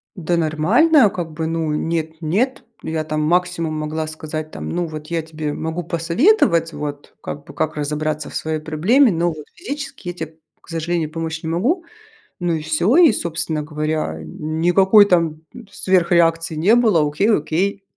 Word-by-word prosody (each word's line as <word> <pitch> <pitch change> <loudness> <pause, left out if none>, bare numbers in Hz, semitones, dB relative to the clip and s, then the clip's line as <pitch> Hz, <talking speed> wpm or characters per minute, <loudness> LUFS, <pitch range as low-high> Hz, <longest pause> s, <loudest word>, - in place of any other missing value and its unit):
Да 175 -1 -1
нормально 210 - +4
как 175 -4 -5
бы. 160 +1 -3
Ну, 165 -1 -1
нет 160 +1 -2
нет. 215 +12 0 0.2
Я 160 -1 -2
там 155 0 -2
максимум 170 0 0
могла 155 +1 -3
сказать 155 0 -6
там: - - -6
"Ну 175 0 -1
вот 155 -1 -8
я 165 0 -1
тебе 155 -2 -5
могу 160 +3 -4
посоветовать, 170 - +2
вот 145 -1 -6
как 145 0 -7
бы - - -12
как 155 - -2
разобраться 150 +1 -2
в - - -11
своей 155 0 -2
проблеме, 185 - +3
но 170 0 0
вот 155 -3 -7
физически 290 - -6
я - - -4
те, 160 -2 -5 0.3
к - - -25
сожалению, 165 -1 -2
помочь 160 0 -4
не 160 - -3
могу". 260 - 0 0.6
Ну 175 -1 0
и 155 - -3
всё. 155 - +2
И, 340 -6 +7
собственно 170 -4 -2
говоря, 150 - -2
никакой 175 - +4
там 165 -4 +1 0.3
сверхреакции 170 -4 +2
не 185 +9 +4
было. 215 -11 +3
Окей 155 +9 +1
окей. 195 +2 0
165 Hz, 165 wpm, -20 LUFS, 155-180 Hz, 0.6 s, И